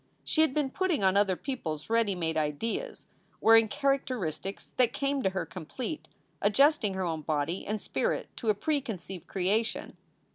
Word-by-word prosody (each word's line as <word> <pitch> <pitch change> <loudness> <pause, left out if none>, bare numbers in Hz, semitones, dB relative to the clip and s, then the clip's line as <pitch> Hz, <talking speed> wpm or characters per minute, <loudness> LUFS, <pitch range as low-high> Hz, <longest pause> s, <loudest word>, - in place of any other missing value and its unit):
She 315 - +2
had 315 - +4
been 275 -1 0
putting 360 - 0
on 190 0 +4
other 200 -2 +3
people 245 - -3
s 150 - -12
ready 225 -3 +2
made 165 -2 -1
ideas, 160 - -2 0.3
wearing 225 0 +7
characteristics 245 - -2
that 250 -2 +4
came 275 0 0
to 190 - +2
her 190 -2 -2
complete, 225 - -6 0.3
adjusting 220 -1 +4
her 190 - -1
own 165 -3 -2
body 155 +3 -1
and 215 +1 -1
spirit - - -1
to 230 - -2
a 210 - +4
preconceived 205 - -3
creation. 200 +5 -1
210 Hz, 160 wpm, -29 LUFS, 180-265 Hz, 0.3 s, wearing